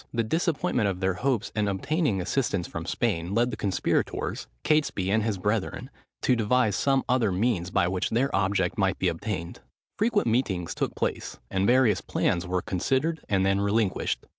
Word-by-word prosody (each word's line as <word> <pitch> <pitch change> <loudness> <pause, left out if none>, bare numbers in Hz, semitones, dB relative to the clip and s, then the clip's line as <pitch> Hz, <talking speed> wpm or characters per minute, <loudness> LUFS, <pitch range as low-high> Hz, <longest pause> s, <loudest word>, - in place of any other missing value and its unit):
The 115 -1 0
disappointment 140 - 0
of 95 -2 -3
their 95 0 +1
hopes 120 +2 -1
in 105 -1 +1
obtaining 135 - 0
assistance 100 -2 -1
from - - -6
Spain, 85 +4 -1
led 120 +2 +2
the - - -3
conspirators, 100 -4 -1 0.2
Catesby, 140 -11 +1
and 110 +2 +3
his 110 -2 -1
brethren, 105 +6 -2 0.3
to 125 - +4
devise 115 -1 +2
some 135 +3 +2
other 120 -5 +2
means, 95 -2 0
by 95 -1 +2
which 90 0 -1
their 130 +5 +1
object 95 -2 0
might - - +2
be - - +1
obtained. 85 +1 -4 0.4
Frequent 215 - +2
meetings 105 -8 0
took - - -2
place; - - -3
and 95 +1 +1
various 120 -6 +4
plans 90 0 0
were 90 0 -1
considered 135 - -1
and 95 -2 +2
then 95 0 +2
relinquished. 100 -1 0
105 Hz, 170 wpm, -27 LUFS, 95-125 Hz, 0.4 s, to